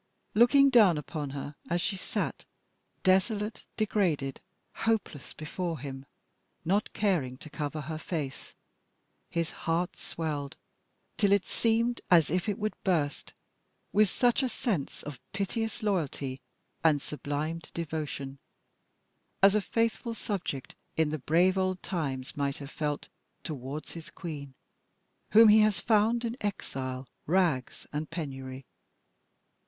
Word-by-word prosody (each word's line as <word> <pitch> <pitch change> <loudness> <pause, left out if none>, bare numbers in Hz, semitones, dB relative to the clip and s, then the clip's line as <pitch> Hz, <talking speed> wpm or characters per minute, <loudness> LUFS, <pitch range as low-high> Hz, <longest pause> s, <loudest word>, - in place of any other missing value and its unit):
Looking 275 +5 +6
down 210 -10 +7
upon 150 0 -4
her 140 +1 -5 0.2
as 175 +1 +2
she 195 - 0
sat 185 - -3 0.6
desolate, 205 +3 +2 0.2
degraded, 175 -11 +1 0.3
hopeless 220 -10 -1
before 165 +2 -3
him, 135 0 -7 0.6
not 200 +5 +1
caring 165 -12 +1
to 155 - -11
cover 150 0 -3
her 155 +2 -4
face, 150 -5 -4 0.7
his 170 -1 -1
heart 170 +2 -1
swelled 150 -4 -4 0.6
till 200 -2 +3
it 200 -2 +4
seemed 230 +1 +1
as 165 -4 +6
if 180 +4 +1
it 205 - -1
would 215 0 -1
burst, 155 -7 0 0.6
with 210 -1 +5
such 245 +6 +3
a 260 - +1
sense 195 - -2
of 145 -4 -7
piteous 220 +4 -2
loyalty 145 -9 -1 0.4
and 155 -3 +5
sublimed 150 +3 -4
devotion 150 -4 -4 1.0
as 195 0 +8
a 210 - +3
faithful 230 +2 0
subject 170 - -3 0.2
in 160 -2 +3
the 155 - -2
brave 180 +7 +3
old 185 -1 0
times 135 -8 -3
might 140 -1 -1
have 140 0 -8
felt 150 -2 -2 0.4
towards 145 -1 -5
his 165 -2 -8
queen 145 -6 -7 0.8
whom 225 +1 +10
he 215 +1 +8
has 215 -2 +4
found 225 +2 +3
in 230 0 -2
exile, 130 -10 -3 0.2
rags, 165 -7 +1
and 150 +1 -2
penury. 135 -5 -5
165 Hz, 125 wpm, -30 LUFS, 145-205 Hz, 1.0 s, whom